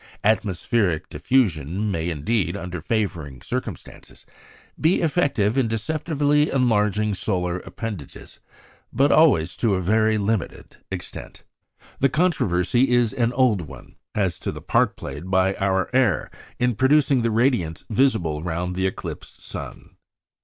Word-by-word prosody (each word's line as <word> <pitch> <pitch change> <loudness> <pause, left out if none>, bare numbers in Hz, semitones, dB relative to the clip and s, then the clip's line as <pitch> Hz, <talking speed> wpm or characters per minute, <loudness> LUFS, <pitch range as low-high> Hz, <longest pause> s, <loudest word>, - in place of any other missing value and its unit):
Atmospheric 100 -3 +1
diffusion 100 - 0
may 85 -2 -2
indeed, 85 +3 -1
under 90 -3 -6
favouring 85 - -2
circumstances, - - -7 0.5
be 160 +4 +3
effective 140 -9 +1
in 125 - +2
deceptively 150 +5 0
enlarging 105 -4 +1
solar 90 -2 -2
appendages; 100 - -8 0.5
but 140 +4 +3
always 130 - +4
to 110 -5 +2
a - - 0
very 110 +4 +2
limited 105 -1 -3
extent. 90 -2 -8 0.6
The 135 - +3
controversy 125 - +1
is 120 -2 +2
an 120 -3 +1
old 120 -6 +3
one - - -13 0.2
as 95 -6 0
to - - -3
the - - -8
part - - +1
played 70 +6 -7
by 95 0 +3
our 95 -1 +1
air 125 -7 +2 0.3
in 125 0 +1
producing 135 +2 +3
the 115 - +1
radiance 110 - 0
visible 110 - +1
round 85 +2 -3
the 95 +1 +1
eclipsed 95 - -7
sun. - - -8
105 Hz, 130 wpm, -23 LUFS, 90-125 Hz, 0.6 s, always